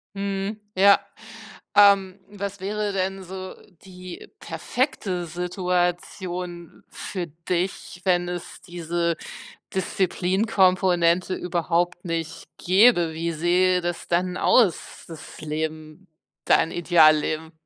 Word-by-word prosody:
Mhm, 200 +1 -3 0.2
ja. 200 +1 +6 0.8
Ähm, 200 -2 +5
was 200 -1 -6
wäre 210 +1 -2
denn 190 0 -2
so 185 +1 -8 0.3
die 185 -1 -10
perfekte 205 - -2
Situation 175 0 -3
für 180 -3 -5
dich, 175 +3 -4
wenn 175 -2 +2
es 175 -1 -7
diese 170 -1 -2 0.6
Disziplinkomponente 185 -1 +2
überhaupt 175 0 -1
nicht 165 -2 -4
gäbe? 185 -3 +4
Wie 165 +1 -2
sähe 180 +3 +2
das 175 0 -4
dann 180 +1 0
aus, 215 -9 +2
das 160 -2 -11
Leben, 155 +3 -5 0.4
dein 160 - +3
Idealleben? 160 -2 +3
180 Hz, 95 wpm, -24 LUFS, 170-190 Hz, 0.8 s, ja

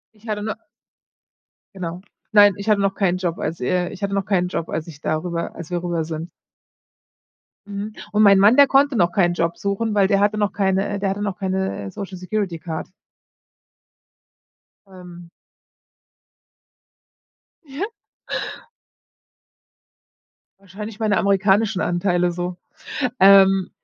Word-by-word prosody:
Ich 215 +2 -18
hatte 210 -1 -2
no 215 +1 -2 1.2
Genau. 175 -2 -5 0.3
Nein, 205 -1 +7
ich 200 +3 -5
hatte 210 -1 +4
noch 195 0 0
keinen 185 -3 +1
Job 180 -2 -2
als 160 +2 -4
äh, 180 +7 0
ich 195 - -11
hatte 200 0 -2
noch 195 0 0
keinen 185 -3 +1
Job, 170 -2 -4
als 160 - -4
ich 155 -3 -12
da 155 - 0
rüber 170 -1 -4
als 170 0 -9
wir 175 0 -2
rüber 170 -2 -1
sind. 160 +1 -6 1.4
Mhm. 205 +1 -5 0.2
Und 210 0 +2
mein 200 -1 +7
Mann, 205 +5 +6
der 285 -1 +8
konnte 275 0 +3
noch 175 -5 +2
keinen 175 -1 +2
Job 170 -1 -1
suchen, 205 +2 -2
weil 200 -2 +4
der 195 0 +2
hatte 205 +1 +2
noch 205 -2 +1
keine 195 0 +1
äh, 200 - -3
der 195 -1 0
hatte 195 +1 -3
noch 200 -2 -3
keine, 190 - -2
äh, 95 - -7
Social-Security-Card. 185 - -4 2.0
Ähm. 180 -2 -13 2.3
Ja. 290 +5 -4 2.7
Wahrscheinlich 205 +3 -9
meine 215 -2 +1
amerikanischen 200 +1 +2
Anteile 175 0 +1
so. 175 +1 -4 0.6
Ähm, 195 -1 +6
195 Hz, 140 wpm, -21 LUFS, 175-205 Hz, 2.7 s, der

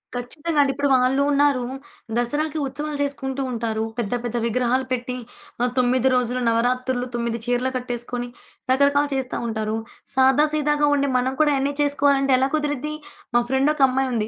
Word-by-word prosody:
ఖచ్చితంగా 295 +6 -3
అండి. 280 -1 +3
ఇప్పుడు 285 +1 0
వాళ్ళు 260 +2 +3
ఉన్నారు. 280 -3 +3 0.5
దసరాకి 295 +6 -1
ఉత్సవాలు 295 +2 -4
చేసుకుంటూ 275 -1 -3
ఉంటారు. 225 -2 -2 0.2
పెద్ద 230 -1 -2
పెద్ద 240 0 -2
విగ్రహాలు 250 +2 +1
పెట్టి, 250 0 -2 0.4
ఆహ్, 245 0 +1
9 255 +1 +3
రోజులు 250 0 0
నవరాత్రులు, 250 +2 0
9 235 -1 -1
చీరలు 245 +1 0
కట్టేసుకొని, 245 0 -4 0.4
రకరకాలు 285 +2 +3
చేస్తా 260 -2 -2
ఉంటారు. 220 -1 -2 0.4
సాదా 265 +3 +5
సీదాగా 295 -1 +2
ఉండే 280 0 +1
మనం 255 +1 0
కూడా 300 -1 +4
అయన్నీ 275 +1 0
చేసుకోవాలంటే 280 -1 +3
ఎలా 265 +1 +1
కుదురుద్ది? 295 -1 -2 0.4
మా 240 - +6
ఫ్రెండొకమ్మాయుంది. 265 -4 +2
260 Hz, 145 wpm, -23 LUFS, 245-285 Hz, 0.5 s, మా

